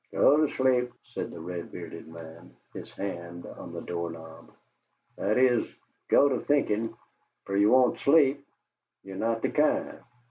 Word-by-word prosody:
"Go 150 +2 +4
to - - -8
sleep," 125 -2 +2
said - - -6
the 85 - -9
red 85 +1 -6
bearded 85 -2 -9
man, 85 +1 -12 0.2
his - - -8
hand 85 -3 -6
on - - -10
the - - -6
door 85 -1 -4
knob. 80 -1 -11 0.7
"That 105 +3 0
is, 125 -2 +4 0.5
go 145 - +6
to 130 -4 0
thinkin', 115 -6 0 0.5
fer 100 - -3
ye 100 +1 +4
won't 125 +2 +4
sleep; 140 -2 +4 0.6
ye're 95 0 -9
not 115 +2 -1
the - - +1
kind. 150 0 +1
105 Hz, 155 wpm, -28 LUFS, 85-130 Hz, 0.7 s, go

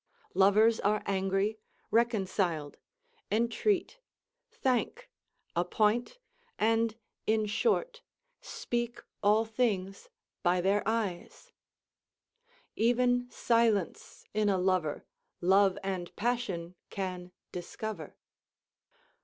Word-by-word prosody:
Lovers 215 +4 +5
are 210 +1 +1
angry, 195 +2 0 0.3
reconciled, 190 -9 0 0.5
intreat, 340 - +1 0.5
thank, 450 - -1 0.4
appoint, 210 - +1 0.4
and, 225 0 +2 0.3
in 220 0 +2
short, 465 - 0 0.4
speak 240 0 -3 0.2
all 210 +2 +4
things 210 -4 -1 0.3
by 180 +1 +2
their 195 +3 +2
eyes: 215 -6 -3 1.2
"Even 245 +2 +2
silence 230 -7 0
in 210 -1 +2
a 195 - +2
lover 180 -5 0 0.3
Love 190 +2 +4
and 185 -3 -4
passion 200 -7 -2 0.2
can 180 -2 -5 0.2
discover." 210 +5 -6
210 Hz, 80 wpm, -30 LUFS, 190-235 Hz, 1.2 s, Lovers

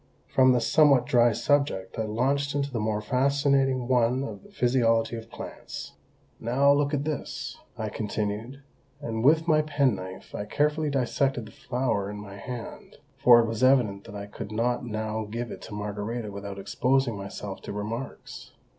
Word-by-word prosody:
From 130 -1 +5
this 120 -2 +2
somewhat 140 -5 +5
dry 120 -1 +4
subject 140 -6 0
I 110 - 0
launched 140 +6 0
into 140 -1 -1
the 120 - -2
more 105 0 -1
fascinating 135 0 +2
one 125 +1 +2
of 140 - -6
the 205 - -17
physiology 120 - +2
of 115 0 -8
plants. - - -8 0.5
"Now, 135 +5 +4
look 145 0 +1
at 140 - -1
this," 150 -2 -4 0.2
I - - -3
continued, 110 +5 -3 0.4
and 115 -5 -3
with 160 +4 +4
my 155 -2 +5
penknife 125 -12 -1
I 105 - -4
carefully 150 +6 +1
dissected 135 -2 0
the 110 - -12
flower 125 -6 -1
in 105 - -6
my 100 -1 -9
hand, 120 +3 -8 0.2
for 120 -1 +8
it - - 0
was 115 +1 -2
evident 120 -7 +3
that 105 - -10
I 100 0 -5
could 105 0 -8
not 120 +3 0
now 110 -1 -3
give 115 +2 -4
it - - -8
to 105 - -8
Margarita 105 +2 -4
without 100 0 -7
exposing 125 +4 +1
myself 100 0 -6
to - - -7
remarks. 110 +5 -6
120 Hz, 170 wpm, -27 LUFS, 105-135 Hz, 0.5 s, for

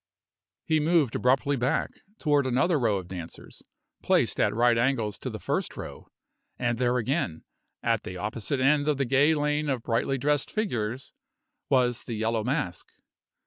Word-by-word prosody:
He 160 -1 +2
moved 155 -5 +2
abruptly 135 +3 +2
back, 125 +1 0 0.3
toward 145 -3 +2
another 140 +6 +2
row 110 -5 +2
of 90 -2 -6
dancers, 85 -3 -9 0.4
placed - - +2
at - - +3
right 120 +1 +3
angles 115 -3 0
to - - -4
the - - -6
first - - -2
row; - - -8 0.5
and 120 -1 -1
there 125 0 +2
again; 125 - -1 0.4
at 115 -2 +1
the 90 - -7
opposite 110 +7 -3
end 145 +2 +3
of 150 -2 +2
the 135 - +1
gay 140 +5 +4
lane 150 0 0
of 130 -4 -1
brightly 120 +3 0
dressed 145 +2 0
figures, 130 - -3 0.6
was 125 -3 +2
the 115 - -4
Yellow 110 0 0
Mask. 125 - -2
125 Hz, 160 wpm, -27 LUFS, 115-145 Hz, 0.6 s, gay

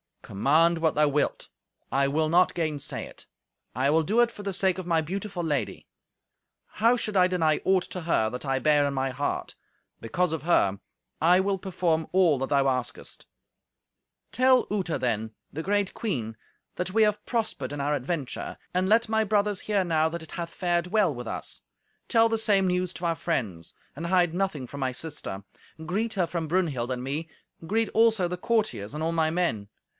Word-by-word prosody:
"Command 155 +11 +3
what 160 -1 +1
thou 150 0 +4
wilt, 145 +1 -1 0.4
I 135 +1 +2
will 155 +3 +1
not 180 +3 +4
gainsay 155 -4 -3
it. - - -12 0.5
I 130 +3 +2
will 160 +2 +4
do 210 +9 +2
it 240 -1 +3
for 205 - -10
the 200 -1 -3
sake 190 -1 +1
of 185 -2 -6
my 165 -2 +2
beautiful 190 +2 -4
lady. 145 -9 -2 0.8
How 230 +3 +2
should 215 -4 -2
I 180 -1 +6
deny 165 -4 +1
aught 190 -1 +3
to 180 - -4
her 160 -10 +1
that 125 +5 -6
I 135 -1 +1
bear 145 +1 +3
in 140 - -1
my 135 0 0
heart? 140 +3 -3 0.4
Because 175 +10 -1
of 160 -3 -3
her, 100 - +2 0.4
I 175 +3 +5
will 195 0 0
perform 175 -4 -1
all 175 -7 +4
that 135 - -2
thou 140 -1 +3
askest." 130 -2 -3 1.0
"Tell 255 0 +4
Uta, 185 -6 -1
then, 110 -3 -1 0.2
the 160 - -4
great 200 +2 0
queen, 115 - -3 0.4
that 180 +1 -3
we 220 0 +5
have 210 -1 +1
prospered 215 - -2
in 145 - -3
our 145 +2 0
adventure; 145 0 -3 0.2
and 185 +1 +1
let 225 +2 +3
my 220 0 +2
brothers 205 -1 +1
hear 200 -3 0
how 160 -1 +2
that 170 0 -6
it 160 - -13
hath 170 -1 -4
fared 175 -1 0
well 200 -4 +2
with 120 -2 -7
us. - - -5 0.5
Tell 230 0 +4
the 225 - +1
same 200 -3 +3
news 180 0 0
to 175 - -6
our 165 -1 +1
friends. 95 - -3 0.2
And 165 +4 -4
hide 175 -2 +3
nothing 180 -7 -1
from 140 +3 -9
my 130 -1 -1
sister. 145 -10 -5 0.4
Greet 215 +6 -1
her 190 -4 +1
from 165 -1 -3
Brunhild 150 -8 0
and 125 -1 -3
me; 150 +5 -3 0.4
greet 225 +3 +1
also 220 -4 +3
the 180 +1 -4
courtiers 210 - -1
and 155 - -3
all 165 - 0
my 160 -1 +2
men. 160 - -1
170 Hz, 190 wpm, -27 LUFS, 145-195 Hz, 1.0 s, I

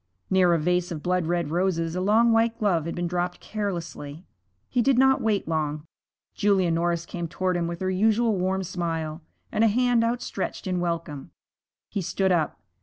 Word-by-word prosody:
Near 185 -2 +4
a - - +3
vase 180 +2 0
of 155 -3 -5
blood 180 -2 0
red 170 -3 -1
roses 170 -2 0
a 180 - -1
long 220 +4 +4
white 225 0 +2
glove 175 -7 +1
had 170 - -4
been 175 - -2
dropped 175 +1 -2
carelessly. 175 -6 -5 0.4
He 245 - +1
did 265 +1 +3
not 265 +1 +4
wait 210 -5 0
long. 155 -1 -2 0.5
Julia 195 -4 +2
Norris 170 0 0
came 175 -1 -5
toward 185 +2 -1
him 170 -1 0
with 170 +1 -5
her 185 0 0
usual 220 +3 +2
warm 190 +1 0
smile, 165 -3 -3 0.3
and 215 - +2
a - - +6
hand 240 +1 +3
outstretched 235 -1 -3
in 185 -1 -1
welcome. 170 -5 -3 0.6
He 200 - -2
stood 190 +2 0
up. 165 -4 0
180 Hz, 185 wpm, -25 LUFS, 170-205 Hz, 0.6 s, a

